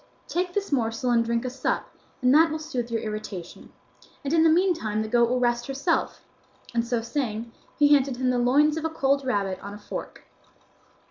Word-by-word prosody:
Take 355 Hz, +1 st, -2 dB
this 405 Hz, -3 st, -2 dB
morsel 235 Hz, -2 st, 0 dB
and 230 Hz, -1 st, +4 dB
drink 235 Hz, +1 st, -1 dB
a -, -, -1 dB
sup, 260 Hz, 0 st, -2 dB, 0.4 s
and 250 Hz, +1 st, +5 dB
that 325 Hz, +2 st, +6 dB
will 310 Hz, -, -2 dB
soothe 260 Hz, -7 st, -4 dB
your 230 Hz, -1 st, -1 dB
irritation, 210 Hz, -5 st, -7 dB, 0.5 s
and 285 Hz, +2 st, -2 dB
in 330 Hz, -, +5 dB
the 325 Hz, -, +6 dB
meantime 320 Hz, -, +1 dB
the -, -, -5 dB
goat 235 Hz, +1 st, +3 dB
will 250 Hz, +1 st, +1 dB
rest 240 Hz, -1 st, 0 dB
herself," 280 Hz, +5 st, -1 dB, 0.5 s
and 235 Hz, -1 st, +1 dB
so 235 Hz, -1 st, -1 dB
saying, 235 Hz, -2 st, -3 dB, 0.3 s
he 290 Hz, -1 st, +5 dB
handed 270 Hz, -3 st, +2 dB
him 255 Hz, 0 st, +1 dB
the 250 Hz, -, +1 dB
loins 290 Hz, +5 st, +3 dB
of 320 Hz, -, -3 dB
a -, -, +1 dB
cold 275 Hz, -3 st, +1 dB
rabbit 200 Hz, -7 st, -1 dB
on 200 Hz, +1 st, -7 dB
a -, -, -11 dB
fork. 205 Hz, -, -7 dB
250 Hz, 200 wpm, -25 LUFS, 230-295 Hz, 0.5 s, that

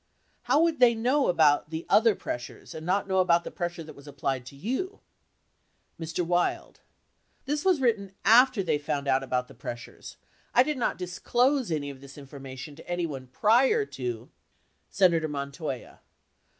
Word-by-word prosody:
How 280 Hz, +4 st, +5 dB
would 330 Hz, -4 st, +1 dB
they 240 Hz, -2 st, +6 dB
know 255 Hz, +5 st, +2 dB
about 150 Hz, -4 st, +3 dB
the 160 Hz, +1 st, -5 dB
other 220 Hz, -1 st, +4 dB
pressures 120 Hz, 0 st, -7 dB
and 155 Hz, -, -7 dB
not 190 Hz, +4 st, 0 dB
know 190 Hz, -1 st, +1 dB
about, 170 Hz, -2 st, +3 dB
the -, -, -7 dB
pressure 175 Hz, -1 st, -4 dB
that 155 Hz, -, -11 dB
was 140 Hz, +1 st, -15 dB
applied 135 Hz, -3 st, -3 dB
to 140 Hz, -, -11 dB
you? 260 Hz, -, -3 dB, 1.0 s
Mr. 165 Hz, +2 st, -3 dB
Wild. 175 Hz, +1 st, -1 dB, 0.7 s
This 295 Hz, +2 st, -1 dB
was 370 Hz, -5 st, +3 dB
written 215 Hz, -7 st, 0 dB
after 245 Hz, -1 st, +6 dB
they 150 Hz, -4 st, 0 dB
found 145 Hz, -1 st, -3 dB
out 135 Hz, 0 st, +3 dB
about 125 Hz, -1 st, -2 dB
the -, -, -14 dB
pressures. 120 Hz, -1 st, -9 dB, 0.4 s
I 250 Hz, -, +7 dB
did 300 Hz, -1 st, -3 dB
not 235 Hz, -, 0 dB
disclose 245 Hz, +8 st, 0 dB
any 145 Hz, -3 st, -2 dB
of 135 Hz, -1 st, -13 dB
this 140 Hz, +1 st, -13 dB
information 135 Hz, 0 st, -9 dB
to 165 Hz, -, -14 dB
anyone 160 Hz, -7 st, -3 dB
prior 245 Hz, -, +3 dB
to 120 Hz, -, -6 dB, 0.6 s
Senator 170 Hz, -4 st, +3 dB
Montoya. 140 Hz, -2 st, -5 dB
170 Hz, 165 wpm, -27 LUFS, 140-235 Hz, 1.0 s, I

